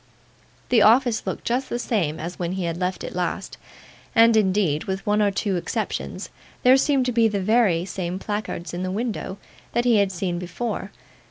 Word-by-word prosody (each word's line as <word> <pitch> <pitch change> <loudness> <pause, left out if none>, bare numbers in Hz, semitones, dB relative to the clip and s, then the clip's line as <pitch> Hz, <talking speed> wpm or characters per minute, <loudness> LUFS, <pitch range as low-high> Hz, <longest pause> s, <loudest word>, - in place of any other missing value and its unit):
The 240 -3 +5
office 235 +2 +4
looked - - -4
just 255 +3 -1
the - - -1
same 195 -10 -1
as 170 +3 -6
when 175 0 -2
he 190 -1 -3
had 170 -1 -2
left 185 0 -2
it - - -6
last, - - -3 0.6
and, 230 0 +6
indeed, 190 -7 +2
with 190 +2 -4
one 210 0 +2
or 205 - +4
two 195 -1 -1
exceptions, 175 - -4 0.3
there 255 +1 +7
seemed 270 -1 +2
to 250 - 0
be 230 -1 +4
the 205 -2 -1
very 195 -4 +2
same 180 -1 -4
placards 205 -4 -4
in 175 - -3
the 185 - -2
window 210 -1 -3 0.4
that 240 +1 +1
he 235 -3 +5
had 200 -2 +2
seen 175 -1 -2
before. 195 +3 -4
200 Hz, 190 wpm, -23 LUFS, 180-230 Hz, 0.6 s, there